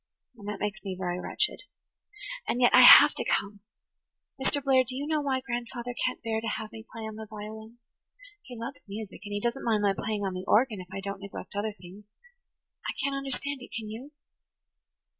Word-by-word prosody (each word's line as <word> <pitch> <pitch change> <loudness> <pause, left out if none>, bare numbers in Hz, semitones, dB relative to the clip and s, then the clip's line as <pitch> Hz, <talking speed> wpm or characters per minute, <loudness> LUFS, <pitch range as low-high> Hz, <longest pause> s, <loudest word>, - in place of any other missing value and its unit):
And 205 -3 -11
that 210 -1 -4
makes 210 +1 -3
me 190 -2 -4
very 180 -1 -2
wretched. - - 0 0.9
And 245 - 0
yet 245 -1 +5
I - - +9
have - - +11
to - - -3
come. 200 0 -1 0.8
Mr. - - +2
Blair, 265 -2 +5
do 255 +1 -6
you 280 +2 -3
know 305 0 0
why 265 -2 0
grandfather 240 -1 -4
can't 255 - -1
bear 220 -1 -1
to 230 - -4
have 220 -1 -7
me 225 -1 -9
play 225 - -7
on 220 -1 -6
the 220 0 -7
violin? 220 +2 -9 0.6
He 245 -10 -10
loves 250 +5 -6
music, 205 0 -7
and 205 - -8
he 205 - -1
doesn't 235 +5 -2
mind 215 -3 +1
my 200 -1 +4
playing 210 +1 -3
on 190 - -2
the 185 0 -5
organ, 220 -3 +3
if 180 - -12
I 195 0 -5
don't 200 0 -5
neglect 200 -1 -8
other 205 +1 -2
things. 185 +4 -12 0.8
I - - -2
can't 280 0 0
understand 275 +1 -3
it, - - -10
can 215 -1 -7
you?" 245 +6 -8
220 Hz, 205 wpm, -28 LUFS, 205-245 Hz, 0.9 s, have